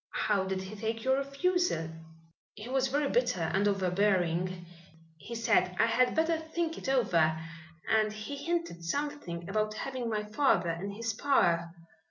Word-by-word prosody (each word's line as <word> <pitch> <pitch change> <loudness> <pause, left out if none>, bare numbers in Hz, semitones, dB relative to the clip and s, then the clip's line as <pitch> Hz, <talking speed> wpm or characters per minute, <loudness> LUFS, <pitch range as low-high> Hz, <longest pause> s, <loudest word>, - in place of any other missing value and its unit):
"How 200 -3 +2
did 190 0 -2
he 190 +3 -8
take 225 +2 -3
your 265 0 +3
refusal?" 275 - 0 0.6
"He 210 +2 -8
was 265 +1 +1
very 285 +2 +1
bitter 245 -8 +1
and 200 +2 +2
overbearing. 185 -2 +1 0.5
He 235 - -7
said 225 -5 +2
I - - +6
had 245 +2 +2
better 320 0 +2
think 325 +1 -3
it - - -4
over, 165 -12 +3 0.5
and 215 -1 +3
he 215 +7 -6
hinted 335 - -3
something 180 - -3
about 215 +1 -1
having 255 0 -3
my 210 -1 -1
father 210 -6 +2
in 175 +5 -4
his 225 +3 -3
power. 170 -10 +2
215 Hz, 155 wpm, -30 LUFS, 185-270 Hz, 0.6 s, I